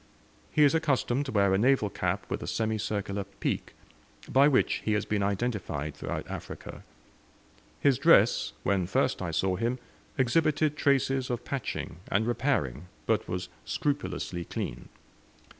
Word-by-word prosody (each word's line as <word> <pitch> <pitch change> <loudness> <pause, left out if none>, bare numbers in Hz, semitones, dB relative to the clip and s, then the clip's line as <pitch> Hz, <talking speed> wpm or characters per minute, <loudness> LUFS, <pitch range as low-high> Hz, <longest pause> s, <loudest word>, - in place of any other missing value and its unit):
He 150 - +4
is 145 - +5
accustomed 140 -3 +1
to - - -3
wear 100 -3 +3
a 95 - +3
naval 120 -3 +3
cap - - -1
with - - -3
a - - -5
semicircular 105 -3 -1
peak, 100 0 -4 0.5
by 135 +2 +5
which 140 -3 +2
he 110 - +1
has 105 - 0
been 105 -1 0
identified 100 - -2
throughout - - -5
Africa. - - -7 1.0
His 140 -4 +4
dress, 60 - +5
when 95 -3 +1
first 95 - +1
I 90 - -2
saw 90 +3 0
him, 120 +4 0 0.4
exhibited 150 +3 +2
traces 135 -3 +2
of 120 -1 -3
patching 130 - -4
and 105 +3 +2
repairing, 115 - 0 0.2
but - - +1
was 90 0 -3 0.2
scrupulously 95 - -2
clean. - - -5
110 Hz, 140 wpm, -29 LUFS, 95-135 Hz, 1.0 s, is